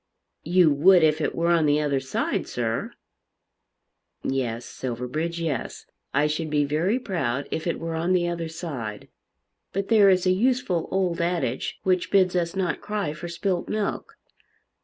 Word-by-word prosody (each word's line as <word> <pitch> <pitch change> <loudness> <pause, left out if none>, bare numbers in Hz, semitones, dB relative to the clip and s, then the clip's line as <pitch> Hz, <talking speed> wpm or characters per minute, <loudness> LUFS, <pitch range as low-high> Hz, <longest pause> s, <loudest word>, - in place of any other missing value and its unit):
"You 175 -1 +4
would 175 +4 +6
if 155 0 +3
it - - -1
were 170 +1 +1
on 165 -3 +3
the 145 +1 +3
other 145 -2 +1
side, 130 0 -2
sir." - - -2 1.3
"Yes, 120 -3 -2
Silverbridge, 130 +7 -4
yes; 155 -7 -3 0.3
I 145 +2 +2
should 155 +1 -1
be 150 -1 +2
very 165 - +1
proud 145 - -2
if 160 - -3
it 170 - -1
were 165 0 -4
on 170 +3 0
the 175 -1 +2
other 170 -1 -3
side. 130 - -6 0.6
But 195 +1 -2
there 210 -3 +6
is 185 -1 +3
a 185 - +4
useful 200 -4 +1
old 185 -3 0
adage 170 -8 -1
which 185 -1 +1
bids 185 -2 +3
us 170 0 0
not 180 -4 -1
cry 205 -7 -2
for 170 +3 -7
spilt 175 +1 -2
milk. 215 -2 -3
170 Hz, 160 wpm, -25 LUFS, 150-185 Hz, 1.3 s, would